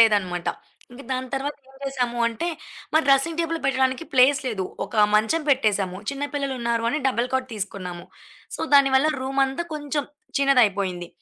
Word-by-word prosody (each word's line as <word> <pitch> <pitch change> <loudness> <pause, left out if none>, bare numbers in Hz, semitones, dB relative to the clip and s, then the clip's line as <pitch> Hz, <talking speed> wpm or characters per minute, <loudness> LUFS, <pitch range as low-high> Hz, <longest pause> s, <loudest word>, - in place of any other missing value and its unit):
లేదన్నమాట. 190 -6 +3 0.4
ఇంక 245 +3 -11
దాని 255 0 -3
తర్వాత 280 +2 -3
ఏం 270 - -19
చేసాము 250 -3 -2
అంటే, 235 +10 -3 0.4
మరి 315 +1 +3
డ్రెస్సింగ్ 275 +5 +3
టేబుల్ 330 0 -1
పెట్టడానికి 260 +2 +1
ప్లేస్ 270 +2 +5
లేదు. 210 -7 -2 0.2
ఒక 215 -2 +3
మంచం 220 +10 +2
పెట్టేసాము. 205 -8 +1
చిన్న 280 +1 -4
పిల్లలున్నారు 245 -5 -1
అని 300 +6 0
డబుల్ 250 -1 0
కాట్ 260 0 0
తీసుకున్నాము. 185 -4 -5 0.5
సో, - - -8
దాని 275 -1 +6
వల్ల 285 +4 +3
రూమంతా 270 +4 0
కొంచెం 290 -1 -2 0.3
చిన్నదయిపోయింది. 200 -10 +2
260 Hz, 150 wpm, -24 LUFS, 215-275 Hz, 0.5 s, దాని